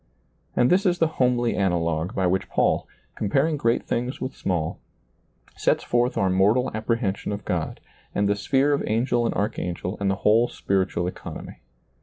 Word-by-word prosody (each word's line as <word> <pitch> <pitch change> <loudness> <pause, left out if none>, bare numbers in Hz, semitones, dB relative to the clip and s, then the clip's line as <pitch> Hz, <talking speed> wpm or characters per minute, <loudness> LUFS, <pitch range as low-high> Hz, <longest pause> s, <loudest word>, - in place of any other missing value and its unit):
And 120 - +3
this 185 +2 +4
is 175 -1 +2
the 165 - +3 0.2
homely 120 -1 +2
analogue 85 -3 0
by 95 - +1
which 95 +2 0
Paul, - - +1 0.3
comparing 140 +10 +1
great 115 -4 +1
things 125 +3 -2
with 130 - -4
small, 85 -4 -2 0.8
sets - - +1
forth 120 +1 +1
our 95 - +2
mortal 105 +8 +3
apprehension 110 -2 -1
of 100 -1 -5
God - - -2 0.4
and 100 0 +2
the 100 - +2
sphere 135 +7 +2
of 140 - 0
angel 120 +1 +1
and - - -2
archangel 90 -2 -2
and 100 -1 +1
the 95 - +1
whole 115 +3 +5
spiritual 95 -5 -1
economy. 90 - -7
105 Hz, 165 wpm, -24 LUFS, 95-125 Hz, 0.8 s, whole